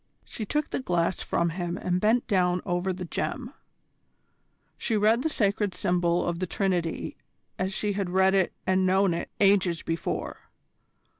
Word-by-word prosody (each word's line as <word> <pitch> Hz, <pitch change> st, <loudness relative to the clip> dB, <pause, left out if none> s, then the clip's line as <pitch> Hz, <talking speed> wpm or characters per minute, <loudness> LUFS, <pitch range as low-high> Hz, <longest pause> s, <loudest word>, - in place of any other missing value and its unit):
She 215 Hz, -, -6 dB
took 300 Hz, +5 st, -1 dB
the -, -, -1 dB
glass 175 Hz, -7 st, 0 dB
from 170 Hz, 0 st, 0 dB
him 175 Hz, 0 st, -3 dB
and 180 Hz, -1 st, -1 dB
bent 225 Hz, +3 st, +3 dB
down 180 Hz, -4 st, +1 dB
over 175 Hz, +2 st, 0 dB
the 180 Hz, 0 st, -5 dB
gem. 250 Hz, -, -4 dB, 1.2 s
She 225 Hz, -, -1 dB
read 220 Hz, +3 st, +3 dB
the 320 Hz, -, 0 dB
sacred 205 Hz, -6 st, 0 dB
symbol 175 Hz, -1 st, +1 dB
of 170 Hz, -1 st, -2 dB
the 185 Hz, -, -2 dB
Trinity 175 Hz, -2 st, -1 dB, 0.4 s
as 185 Hz, +1 st, 0 dB
she 205 Hz, +1 st, -1 dB
had 195 Hz, -2 st, -2 dB
read 190 Hz, +1 st, +3 dB
it 190 Hz, -2 st, +2 dB
and 185 Hz, 0 st, +2 dB
known 190 Hz, -1 st, +3 dB
it 170 Hz, -, -4 dB
ages 195 Hz, -5 st, +3 dB
before. 165 Hz, 0 st, -4 dB
185 Hz, 160 wpm, -27 LUFS, 175-205 Hz, 1.2 s, bent